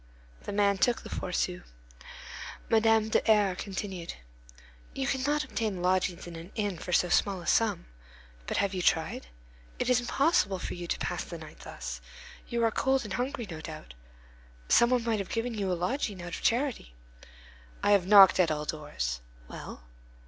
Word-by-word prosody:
The - - -4
man 200 -1 +2
took 245 +3 +2
the - - -9
four 180 - -4
sous. 180 0 -1 1.1
Madame 225 -1 +4
de - - +3
R—— 205 -3 +4
continued: 190 -2 -5 0.8
"You 270 - -1
cannot 280 +3 0
obtain 210 -6 -3
lodgings 185 -1 +1
in 175 -1 -8
an 165 +4 -9
inn 205 -6 -2
for 180 - -6
so 180 - +4
small 195 0 +2
a 170 - -10
sum. 225 - +2 0.6
But - - -1
have 200 -1 +1
you 185 - -2
tried? 160 - +1 0.5
It 250 - 0
is 250 - +5
impossible 245 - +2
for - - -5
you 175 -1 -6
to - - -1
pass - - -3
the - - -7
night - - -12
thus. - - -7 0.5
You 235 -1 -1
are 225 - +2
cold 265 +3 +1
and 210 -4 -6
hungry, 245 0 -2
no 160 -4 -7
doubt. 60 - -9 0.8
Some 235 - +6
one 250 -2 +2
might 225 -2 0
have 195 - -4
given 235 +1 -2
you 200 -4 -1
a 180 - 0
lodging 205 +1 -2
out 175 0 -6
of - - -8
charity." 240 - 0 0.9
"I - - +3
have 195 -3 +4
knocked 195 -2 +8
at 180 - +4
all 150 -1 -2
doors." 65 - -3 0.3
"Well?" 60 - -9
200 Hz, 180 wpm, -29 LUFS, 180-230 Hz, 1.1 s, knocked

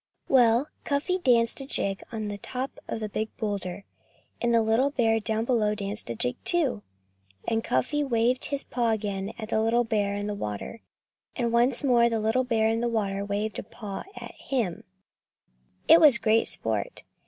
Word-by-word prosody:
Well! 245 +1 +4 0.2
Cuffy 300 +6 -1
danced 240 -4 +2
a - - -6
jig 195 -7 -1
on 220 -2 -4
the 205 0 -5
top 255 +6 -5
of - - -4
the 215 - -2
big 215 +1 -3
boulder. 200 -3 -4 0.6
And 240 - +1
the 230 -1 +4
little 225 +5 +2
bear 225 -5 +1
down 220 +1 -1
below 215 -4 +1
danced 200 - -4
a 115 - -3
jig, 125 +3 -1
too. 295 -11 +2 0.7
And 225 0 0
Cuffy 290 - 0
waved 245 -1 +1
his 280 -1 0
paw 240 -2 -1
again 200 -2 -2
at 220 -2 -7
the 220 - +1
little 230 +2 +2
bear 205 -3 -1
in 205 0 -3
the 210 - -2
water. 105 - -6 0.5
And 235 -2 -1
once 240 +3 +4
more 240 -3 +4
the 225 -1 -1
little 220 +4 +1
bear 225 -3 +1
in 225 +1 +1
the 240 - 0
water 200 -3 -1
waved 205 +1 -3
a - - -5
paw 205 -4 -7
at - - -8
him. 230 -11 -3 1.0
It 335 - +8
was 290 -6 +8
great 220 +1 +2
sport. - - -2
225 Hz, 185 wpm, -26 LUFS, 210-245 Hz, 1.0 s, It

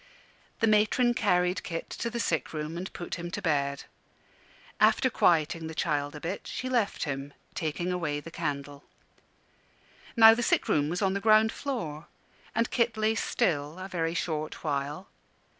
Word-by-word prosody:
The - - +5
matron 215 +3 +3
carried 180 -6 +1
Kit 165 -2 -5
to 235 - -1
the 235 - -4
sick 165 -8 -1
room 155 +1 -4
and 180 +2 -5
put 175 -1 -6
him 175 0 -5
to - - -4
bed. 140 -3 0 1.0
After 260 - +4
quieting 165 -3 +2
the 160 - -7
child 145 -1 -1
a - - -6
bit 175 +6 -5
she 255 - -4
left 235 -5 0
him, 140 -1 -4 0.2
taking 175 +2 -2
away 160 -5 -1
the 165 +3 -10
candle. 145 -2 -4 1.3
Now 225 -1 +10
the 235 - -1
sick - - +2
room 145 0 +2
was 180 +5 -1
on 190 -1 +2
the 200 - -2
ground 215 +1 +5
floor, 165 - -4 0.5
and 230 +1 +1
Kit 235 -2 +1
lay 215 0 +2
still 160 -9 0
a 185 +1 -6
very 165 -3 -2
short 155 -3 -3
while. 145 +3 -2
175 Hz, 165 wpm, -28 LUFS, 150-215 Hz, 1.3 s, Now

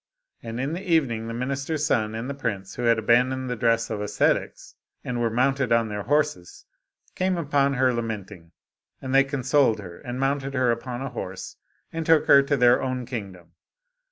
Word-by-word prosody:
And 115 +1 -6
in 135 +4 -2
the 175 - -4
evening 140 - 0
the 115 - -5
minister's 140 +5 -2
son 110 -5 0
and 115 +3 -4
the 140 - -3
prince, 100 -8 -4
who 120 - -4
had 115 -1 +4
abandoned 125 +3 +2
the - - -1
dress 115 -1 +1
of 105 -2 -3
ascetics, 105 - -1 0.3
and 120 -1 -3
were 115 - +1
mounted 130 +3 +1
on 115 -1 +3
their 105 -1 -4
horses, 145 -9 -1 0.5
came 185 -1 0
upon 140 -3 +1
her 130 -1 +2
lament 110 -4 -4
ing. 85 -4 -14 0.5
And 130 0 -5
they 135 0 +6
consoled 135 -3 +2
her, 90 -5 -10
and 120 +1 -6
mounted 135 0 -1
her 130 -2 +2
upon 120 +2 -4
a 135 - -4
horse, 95 0 -7 0.4
and 165 0 -2
took 160 -1 +4
her 140 - +7
to 140 +1 0
their 125 -1 +5
own 130 -1 -3
kingdom. 100 -8 -7
125 Hz, 190 wpm, -25 LUFS, 115-140 Hz, 0.5 s, her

